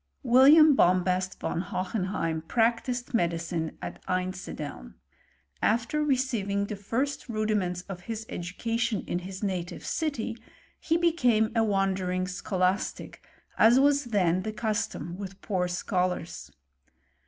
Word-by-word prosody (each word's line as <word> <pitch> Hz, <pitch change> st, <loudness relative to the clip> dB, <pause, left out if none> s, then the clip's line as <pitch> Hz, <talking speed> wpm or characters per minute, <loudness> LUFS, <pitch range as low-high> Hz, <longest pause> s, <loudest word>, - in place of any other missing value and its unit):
William 280 Hz, +5 st, +7 dB
Bombast 185 Hz, -3 st, +2 dB
von 170 Hz, -, -2 dB
Ho 185 Hz, 0 st, -3 dB
henheim 180 Hz, -5 st, -2 dB
practised 240 Hz, +2 st, 0 dB
medicine 170 Hz, -4 st, -1 dB
at -, -, -7 dB
Einsideln.* 180 Hz, -, -4 dB, 0.7 s
After 235 Hz, +7 st, +1 dB
receiving 235 Hz, -8 st, 0 dB
the 210 Hz, -, -5 dB
first 250 Hz, +8 st, -3 dB
rudiments 210 Hz, -5 st, -1 dB
of 180 Hz, -2 st, -8 dB
his 225 Hz, -1 st, -4 dB
education 225 Hz, +5 st, -2 dB
in 175 Hz, -, -2 dB
his 185 Hz, +1 st, -8 dB
^ihe 185 Hz, -4 st, -3 dB
city, 290 Hz, -8 st, -2 dB, 0.4 s
he 330 Hz, -, +1 dB
became 250 Hz, -11 st, +2 dB
a 225 Hz, -, +4 dB
wandering 190 Hz, -3 st, 0 dB
scholastic, 185 Hz, 0 st, -2 dB, 0.4 s
as 235 Hz, +3 st, +7 dB
was 285 Hz, 0 st, +3 dB
then 185 Hz, -6 st, +1 dB
the 215 Hz, -, -3 dB
custom 215 Hz, -7 st, -3 dB
with 195 Hz, -1 st, -7 dB
poor 185 Hz, -4 st, -1 dB
scholars. 180 Hz, -, -2 dB
200 Hz, 120 wpm, -28 LUFS, 180-235 Hz, 0.7 s, William